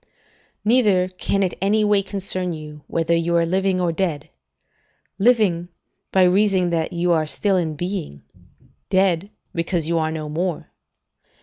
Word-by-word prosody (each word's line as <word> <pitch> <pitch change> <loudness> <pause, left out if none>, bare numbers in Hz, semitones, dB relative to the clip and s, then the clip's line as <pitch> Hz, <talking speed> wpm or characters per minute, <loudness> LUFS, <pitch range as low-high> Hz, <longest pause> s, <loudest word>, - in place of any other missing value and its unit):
"Neither 210 -6 +3
can 195 +2 -1
it 185 - -1
any 210 +2 +2
way 205 -1 +3
concern 190 -2 -3
you, 150 -1 -9
whether 165 0 0
you 170 +1 0
are 170 - +3
living 190 +2 +1
or 175 -2 +1
dead: 165 -4 -2 0.9
living, 195 -6 +2 0.4
by 190 - +4
reason 185 -1 +3
that 165 0 -1
you 175 0 0
are 160 -2 +2
still 195 +5 0
in 165 -4 -1
being; 175 - -5 0.7
dead, 190 -1 +2 0.2
because 170 -1 -1
you 165 0 +1
are 160 0 0
no 155 -1 -4
more. 170 +3 -3
180 Hz, 145 wpm, -21 LUFS, 165-195 Hz, 0.9 s, by